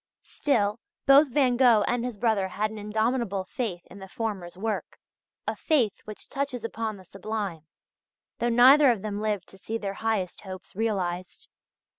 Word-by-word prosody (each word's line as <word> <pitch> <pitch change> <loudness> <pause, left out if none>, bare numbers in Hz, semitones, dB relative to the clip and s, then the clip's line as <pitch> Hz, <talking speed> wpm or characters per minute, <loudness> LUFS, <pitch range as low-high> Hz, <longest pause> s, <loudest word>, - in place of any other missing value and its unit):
Still 220 -6 0 0.3
both 280 +2 +7
Van 250 -2 +2
Gogh 240 -5 +6
and 245 +2 0
his 245 -4 -4
brother 210 -3 +1
had 215 +3 -2
an 220 - -7
indomitable 220 -1 0
faith 185 -3 -4
in 200 - -13
the 190 - -9
former's 190 -4 -4
work 215 +2 -3 0.5
a - - -2
faith 255 - +1
which 215 -1 -10
touches 275 -4 -3
upon 225 -2 -3
the 190 - -15
sublime 195 -4 -5 0.7
though 240 - +1
neither 260 +4 +7
of 220 -5 +1
them 210 -1 -3
lived 210 -3 -1
to 195 - -15
see 225 +4 -3
their 200 -3 -4
highest 220 -5 -1
hopes 185 -2 -10
realized. 185 -5 -2
215 Hz, 165 wpm, -27 LUFS, 195-240 Hz, 0.7 s, both